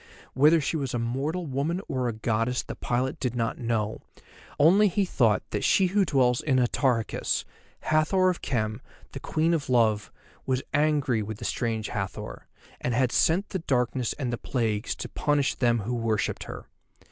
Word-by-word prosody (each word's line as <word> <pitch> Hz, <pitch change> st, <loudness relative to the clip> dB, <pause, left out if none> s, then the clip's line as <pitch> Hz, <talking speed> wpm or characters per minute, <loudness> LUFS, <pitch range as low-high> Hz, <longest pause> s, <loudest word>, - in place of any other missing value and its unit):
Whether 150 Hz, +5 st, +5 dB
she 155 Hz, -, -2 dB
was 135 Hz, -4 st, -3 dB
a -, -, +1 dB
mortal 135 Hz, +9 st, -2 dB
woman 145 Hz, +5 st, -1 dB
or 130 Hz, -2 st, -1 dB
a -, -, 0 dB
goddess 115 Hz, +3 st, -1 dB
the -, -, -6 dB
pilot 125 Hz, +2 st, -2 dB
did 125 Hz, -1 st, -2 dB
not 115 Hz, -2 st, -1 dB
know, 110 Hz, -3 st, -1 dB, 0.6 s
only 190 Hz, +8 st, +6 dB
he 195 Hz, +1 st, +1 dB
thought 115 Hz, -, +2 dB
that -, -, -2 dB
she 190 Hz, -, +4 dB
who 200 Hz, -2 st, +4 dB
dwells 125 Hz, -6 st, +2 dB
in 135 Hz, -4 st, +1 dB
Atarhechis, 125 Hz, -2 st, 0 dB, 0.4 s
Hathor 185 Hz, +4 st, +3 dB
of 180 Hz, -, -7 dB
Khem, 110 Hz, -2 st, -2 dB, 0.3 s
the 135 Hz, -, -7 dB
Queen 160 Hz, +5 st, 0 dB
of 150 Hz, -5 st, -2 dB
Love, 110 Hz, -4 st, +2 dB, 0.3 s
was 130 Hz, 0 st, -1 dB
angry 145 Hz, -6 st, +2 dB
with 105 Hz, 0 st, -5 dB
the -, -, -7 dB
strange 115 Hz, -3 st, -2 dB
Hathor, 100 Hz, -3 st, -5 dB, 0.3 s
and 125 Hz, -, -1 dB
had 125 Hz, 0 st, +2 dB
sent 180 Hz, +5 st, +2 dB
the 190 Hz, -, -3 dB
darkness 125 Hz, -5 st, 0 dB
and 125 Hz, -4 st, -3 dB
the 120 Hz, -, -3 dB
plagues 110 Hz, -3 st, -1 dB
to -, -, -6 dB
punish 145 Hz, -2 st, 0 dB
them 120 Hz, -3 st, +1 dB
who 115 Hz, +5 st, -3 dB
worshipped 115 Hz, -3 st, -1 dB
her. -, -, -8 dB
125 Hz, 175 wpm, -27 LUFS, 115-150 Hz, 0.6 s, only